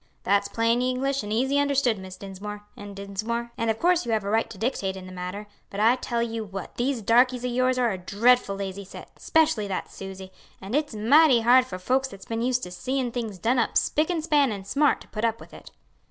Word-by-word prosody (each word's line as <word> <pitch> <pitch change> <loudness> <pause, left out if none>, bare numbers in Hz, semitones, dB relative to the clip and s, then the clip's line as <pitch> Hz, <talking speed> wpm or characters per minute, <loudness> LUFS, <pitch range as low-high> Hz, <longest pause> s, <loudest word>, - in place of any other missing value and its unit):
"That's 200 +1 +2
plain 230 +3 +1
English 260 +2 0
and 210 - -6
easy 265 +6 +1
understood, 275 -6 +2
Miss 190 0 -9
Dinsmore, 205 +2 -8
and 205 -1 -9
Dinsmore, 215 +4 -4
and 230 -1 -1
of 220 - +1
course 355 +3 +2
you 235 - -3
have 215 -2 0
a 200 - -3
right 225 +1 +1
to 200 - -10
dictate 195 -4 -2
in 185 - -9
the 185 - -10
matter; 185 +3 -6 0.2
but 200 - -6
I 225 +4 +5
tell 235 -2 -2
you 225 -1 -3
what, 195 -3 -7
these 245 -2 -1
darkies 245 +3 +3
o' - - +1
yours 255 +1 +1
are 245 -2 +2
a 190 - -4
dreadful 205 +3 +2
lazy 195 0 -5
set, 190 - -13
specially 315 -10 +2
that 190 -2 -4
Suse; 190 -1 -9 0.3
and 195 +3 -8
it's 295 -4 0
mighty 255 +4 +5
hard 250 +2 +5
for 185 - -6
folks 260 +8 0
that's 195 -7 -12
been 225 0 -3
used 250 +1 0
to 180 - -6
seein' 255 +6 -2
things 225 -5 -4
done 235 +8 +1
up 230 - +1
spick 310 +3 +1
and 335 -3 -1
span 290 -5 +3
and 200 -2 -6
smart 285 +8 +2
to - - -14
put 215 0 -5
up 230 0 +1
with - - -14
it." - - -12
230 Hz, 235 wpm, -25 LUFS, 200-255 Hz, 0.3 s, I